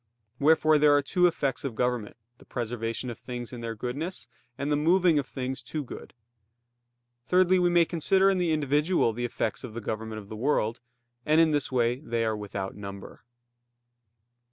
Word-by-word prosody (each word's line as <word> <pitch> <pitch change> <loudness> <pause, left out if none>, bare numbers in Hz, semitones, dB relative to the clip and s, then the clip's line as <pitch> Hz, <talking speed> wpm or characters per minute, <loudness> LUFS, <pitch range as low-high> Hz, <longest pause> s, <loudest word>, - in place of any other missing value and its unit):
Wherefore 155 +1 +4
there 145 -1 +6
are 145 - +1
two 180 +5 +3
effects 140 -5 -1
of 135 -5 -4
government, 125 -2 -1 0.2
the - - -16
preservation 115 0 -3
of 120 - -10
things 120 0 -7
in 120 - -7
their 115 -1 -4
goodness, 140 - -4 0.3
and 140 +2 -2
the - - +3
moving 170 +1 +3
of 135 - -4
things 130 0 -4
to 145 +5 -4
good. 125 - -10 1.1
Thirdly, 185 +2 +4
we 175 0 +3
may 175 -1 +4
consider 185 +4 +2
in 195 -1 +3
the 175 -2 +1
individual 150 -2 +2
the 120 +2 -3
effects 115 0 -2
of 115 -4 -8
the - - -3
government 110 0 -4
of 105 -2 -9
the 110 - -8
world; 115 -2 0 0.4
and 155 +4 +3
in 165 -1 +5
this 145 -3 0
way 120 0 +1
they 115 -5 -2
are 110 -1 0
without 100 -2 -5
number. 100 -1 -9
130 Hz, 180 wpm, -27 LUFS, 115-155 Hz, 1.1 s, there